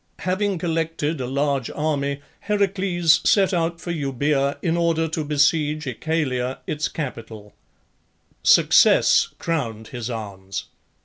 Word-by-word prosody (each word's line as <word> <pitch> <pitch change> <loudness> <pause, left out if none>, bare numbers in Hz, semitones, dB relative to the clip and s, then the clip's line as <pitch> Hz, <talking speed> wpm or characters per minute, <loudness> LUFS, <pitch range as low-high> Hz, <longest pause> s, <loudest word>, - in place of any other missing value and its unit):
Having 190 +1 0
collected 165 -3 -2
a 125 - -3
large 140 -1 -1
army 140 -2 -2 0.3
Heracles 190 -5 +2
set 195 -2 +3
out 170 -1 -1
for 175 - -5
Euboea 140 -2 0
in 170 -2 +1
order 165 -1 +1
to 160 0 -2
besiege 150 +1 +1
Oechalia, 130 -2 -2
its 150 0 -2
capital. 115 -8 -7 0.9
Success - - +5
crowned 115 -10 -3
his 120 -2 -5
arms. 100 -4 -6
150 Hz, 115 wpm, -22 LUFS, 130-165 Hz, 0.9 s, Success